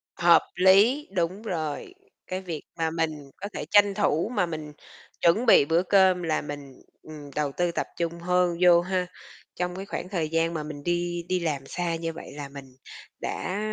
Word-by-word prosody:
Hợp 170 Hz, -2 st, +5 dB
lý, 205 Hz, +10 st, +5 dB
đúng 180 Hz, +4 st, -1 dB
rồi, 165 Hz, -, -4 dB, 0.3 s
cái 185 Hz, +1 st, -3 dB
việc 170 Hz, -5 st, -5 dB, 0.2 s
mà 165 Hz, -1 st, 0 dB
mình 155 Hz, -3 st, -3 dB
có 200 Hz, -, -4 dB
thể -, -, -4 dB
tranh 205 Hz, -1 st, +6 dB
thủ 195 Hz, -1 st, +1 dB
mà 185 Hz, -, +2 dB
mình 155 Hz, -3 st, -6 dB, 0.5 s
chuẩn 175 Hz, +8 st, +3 dB
bị 180 Hz, -, +7 dB
bữa 165 Hz, +4 st, +2 dB
cơm 190 Hz, -2 st, +4 dB
là 160 Hz, -2 st, 0 dB
mình, 145 Hz, -3 st, -9 dB, 0.2 s
ừm, 150 Hz, -2 st, -10 dB
đầu 150 Hz, -2 st, 0 dB
tư 175 Hz, -1 st, +1 dB
tập -, -, -2 dB
trung 170 Hz, 0 st, -2 dB
hơn 180 Hz, 0 st, +1 dB
vô 175 Hz, -1 st, +7 dB
ha. 180 Hz, 0 st, -1 dB, 0.5 s
Trong 180 Hz, 0 st, -2 dB
cái 195 Hz, -, -6 dB
khoảng 180 Hz, -2 st, -5 dB
thời 165 Hz, -6 st, -2 dB
gian 165 Hz, +1 st, +1 dB
mà 155 Hz, -2 st, -3 dB
mình 150 Hz, -1 st, -8 dB
đi 175 Hz, 0 st, -1 dB
đi 185 Hz, -, +1 dB
làm 150 Hz, -5 st, -2 dB
xa 175 Hz, +2 st, -2 dB
như 165 Hz, 0 st, -4 dB
vậy 160 Hz, -, -10 dB
là 145 Hz, -1 st, -6 dB
mình 140 Hz, -1 st, -10 dB, 0.6 s
đã 190 Hz, +2 st, -3 dB
170 Hz, 190 wpm, -26 LUFS, 155-185 Hz, 0.6 s, bị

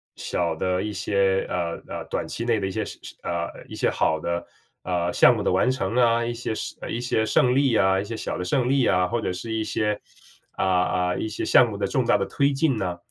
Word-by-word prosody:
小 85 Hz, -2 st, -2 dB
的 90 Hz, +2 st, 0 dB
一 105 Hz, -, -3 dB
些， 95 Hz, 0 st, +1 dB
呃 85 Hz, -2 st, -2 dB
呃， -, -, -6 dB
短 -, -, -2 dB
期 115 Hz, -, -4 dB
内 115 Hz, -2 st, +2 dB
的 95 Hz, -, -2 dB
一 -, -, -4 dB
些 105 Hz, +1 st, -2 dB
是 -, -, -9 dB
是， -, -, -10 dB
呃， 85 Hz, 0 st, -2 dB, 0.2 s
一 -, -, -11 dB
些 -, -, +1 dB
好 80 Hz, -, +1 dB
的， 85 Hz, +2 st, -3 dB, 0.4 s
呃， 90 Hz, -1 st, -1 dB
项 120 Hz, 0 st, +6 dB
目 105 Hz, -, -2 dB
的 -, -, +1 dB
完 95 Hz, +7 st, +3 dB
成 105 Hz, -5 st, -2 dB
啊， 120 Hz, -1 st, +3 dB
一 120 Hz, -, -2 dB
些 115 Hz, -1 st, -4 dB
胜 -, -, -5 dB
呃 -, -, -5 dB
一 115 Hz, -, -2 dB
些 120 Hz, -2 st, 0 dB
胜 125 Hz, +3 st, +3 dB
利 135 Hz, -4 st, +3 dB
啊， 95 Hz, -2 st, +3 dB
一 -, -, -2 dB
些 115 Hz, -, -5 dB
小 -, -, -4 dB
的 90 Hz, -, -3 dB
胜 125 Hz, +7 st, +1 dB
利 135 Hz, -2 st, +3 dB
啊， 90 Hz, -1 st, +3 dB
或 120 Hz, +5 st, -1 dB
者 100 Hz, -, -2 dB
是 115 Hz, +5 st, -6 dB
一 110 Hz, 0 st, -1 dB
些， 105 Hz, -1 st, -1 dB, 0.5 s
啊 -, -, -3 dB
啊 90 Hz, -1 st, +1 dB
一 -, -, -2 dB
些 110 Hz, -, -4 dB
项 120 Hz, 0 st, +6 dB
目 105 Hz, -, -6 dB
的 100 Hz, -1 st, -1 dB
重 125 Hz, +4 st, 0 dB
大 105 Hz, -, +4 dB
的 100 Hz, -, 0 dB
推 140 Hz, 0 st, +1 dB
进 135 Hz, -3 st, +1 dB
呢。 90 Hz, -4 st, -2 dB
105 Hz, 275 characters per minute, -24 LUFS, 90-120 Hz, 0.5 s, 项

